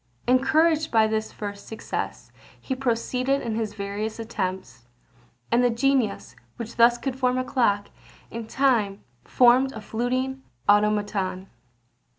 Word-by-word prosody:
Encouraged 310 +5 +3
by 220 -1 +4
this 220 0 -2
first 205 -1 -7
success, 220 - -5 0.3
he 265 - -4
proceeded 255 +1 -1
in 230 - -2
his 215 -2 -3
various 205 +2 -4
attempts; 185 - -5 0.6
and 240 +1 +4
the 245 - +4
genius, 255 0 0 0.2
which 235 -2 -7
thus 240 +1 +6
could 265 +1 -4
form 255 -1 +1
a 255 - 0
clock, 205 -7 +1 0.4
in 230 -1 -6
time 225 -7 +1 0.2
formed 255 +2 +4
a 220 - -7
fluting 255 +4 -2 0.3
automaton. 205 -2 +1
230 Hz, 130 wpm, -25 LUFS, 210-255 Hz, 0.6 s, thus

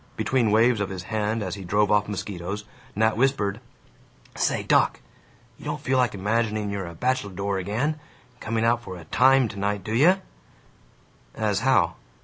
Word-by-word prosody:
Between 125 -4 +1
waves 115 +2 +4
of 100 - -1
his 95 -2 -6
hand 110 +1 -1
as 95 -3 -4
he 100 -1 -7
drove 105 +3 +1
off 105 0 +3
mosquitos, 100 0 -5 0.3
Nat 110 +1 +2
whispered, 110 -5 +1 0.8
"Say, - - 0
doc, - - +3 0.6
you - - -12
don't - - -3
feel 130 0 +1
like 125 -4 +1
imagining 105 +1 -1
you're 100 -3 -4
a 85 - -9
bacheldore 100 -4 -1
again, 105 +10 -1 0.4
and 125 - -30
coming 110 0 -1
out 120 +1 +2
for 95 -6 -8
a 85 - -11
Time 130 +6 +4
tonight, 100 -2 -2
do 110 - -4
you?" 170 +11 +5 1.2
"As - - 0
how?" - - +2
105 Hz, 165 wpm, -25 LUFS, 100-115 Hz, 1.2 s, you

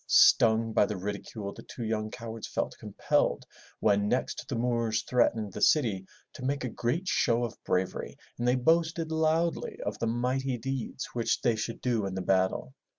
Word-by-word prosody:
Stung 115 0 +5
by 105 - +4
the 105 - -3
ridicule, 100 +1 -5
the - - -10
two 120 - -8
young 110 -1 -1
cowards 115 -1 -7
felt - - -2
compelled - - 0 0.4
when 100 0 +3
next 125 - -1
the 135 - -2
Moors 115 -2 0
threatened 110 -5 +1
the - - -6
city, 110 - +3 0.3
to 130 - -9
make 140 +1 -1
a 125 - -2
great 125 - -2
show 120 -8 +2
of 120 - -5
bravery 90 0 -2 0.2
and 120 - 0
they 125 - +4
boasted 165 +4 +2
loudly 160 +1 +1
of - - -3
the 115 - 0
mighty 125 +3 0
deeds 130 +1 -4
which 115 -2 0
they 120 -3 +3
should 115 +2 -4
do 115 -5 0
in 95 - -5
the 95 - -2
battle. 95 -7 +1
115 Hz, 180 wpm, -29 LUFS, 110-130 Hz, 0.4 s, Stung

